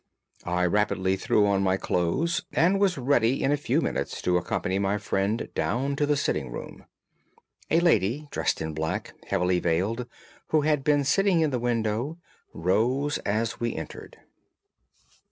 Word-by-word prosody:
I 90 0 +1
rapidly 95 0 +1
threw 105 +2 +2
on 100 -1 +2
my 95 -1 +2
clothes 110 - 0
and 185 +4 +3
was 195 -3 +2
ready 130 -1 +2
in 135 - +2
a - - +4
few 145 - 0
minutes - - -2
to 90 - +2
accompany 95 +2 -1
my 100 +1 +1
friend 100 +2 -1
down 135 +4 -1
to 145 - +1
the 145 0 +2
sitting - - -1
room. - - -8 0.8
A 165 - +4
lady 140 - +2
dressed - - -1
in 80 0 -4
black 80 +1 -3
and - - -24
heavily 90 -2 +1
veiled, 100 +9 -1 0.4
who 155 - +2
had 150 -2 +1
been 145 -1 +3
sitting 180 +5 +3
in 155 -2 +2
the 125 - -1
window, 120 +5 -1 0.3
rose 120 - 0
as 110 +2 -2
we 120 -1 -2
entered. - - -8
115 Hz, 160 wpm, -26 LUFS, 95-145 Hz, 0.8 s, a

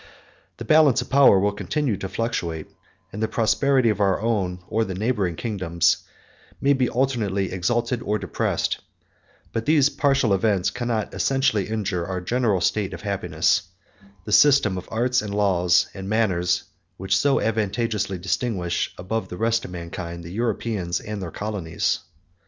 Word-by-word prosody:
The - - -7
balance 155 -5 +5
of - - -18
power 135 -7 +7
will 100 +2 +2
continue 130 +4 -1
to 95 - -5
fluctuate, 85 -10 -3 0.5
and 105 - -5
the 110 - +1
prosperity 125 +3 +2
of 105 -2 0
our 100 -2 +2
own, 100 -5 -1
or 115 +1 0
the 95 -4 -4
neighboring 100 -4 -1
kingdoms, 85 -6 +1 0.6
may 140 +1 +3
be 130 -2 +1
alternately 110 -7 0
exalted 115 +6 -1
or 105 -1 -1
depressed; - - -1 0.7
but 115 +3 -3
these 150 -2 +4
partial 135 -6 +2
events 95 -1 +1
cannot 120 -3 -2
essentially 135 -7 +1
injure 100 -5 -2
our 95 -1 -3
general 110 0 0
state 100 -1 0
of - - -12
happiness, 100 -2 +1 0.6
the 105 - -6
system 110 -2 +5
of 90 - -7
arts, 125 +3 +1
and 105 -1 -5
laws, 90 -3 +3
and 95 0 -7
manners, 90 -5 +1 0.3
which 95 +1 0
so 140 +6 +3
advantageously 105 -2 -1
distinguish, 90 -1 -1
above 95 +2 -3
the 90 - -7
rest 115 +2 +1
of - - -7
mankind, 85 -1 -7
the 85 - -9
Europeans 105 -5 -1
and 105 -1 -6
their 90 - -4
colonies. 95 -5 -2
105 Hz, 155 wpm, -23 LUFS, 95-120 Hz, 0.7 s, power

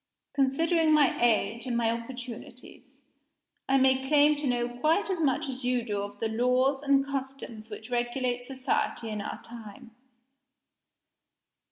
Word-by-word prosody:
Considering 310 +4 +2
my 300 -3 +4
age 230 +1 +1
and 240 -2 0
my 230 -1 +2
opportunities, 240 +1 -9 0.7
I 270 - +5
may 265 0 +3
claim 295 +1 +5
to 290 -1 -3
know 240 -1 +1
quite 305 +11 0
as 365 - -2
much 300 0 +1
as 260 -1 -6
you 250 -1 +1
do 205 -3 -2
of 205 0 -7
the 225 - 0
laws 250 +4 +1
and 275 -1 +3
customs 265 -5 -6
which 220 +2 -9
regulate 245 0 -1
society 260 -3 -2
in 210 -1 -3
our - - -5
time. 235 +1 -11
250 Hz, 145 wpm, -28 LUFS, 235-275 Hz, 0.7 s, I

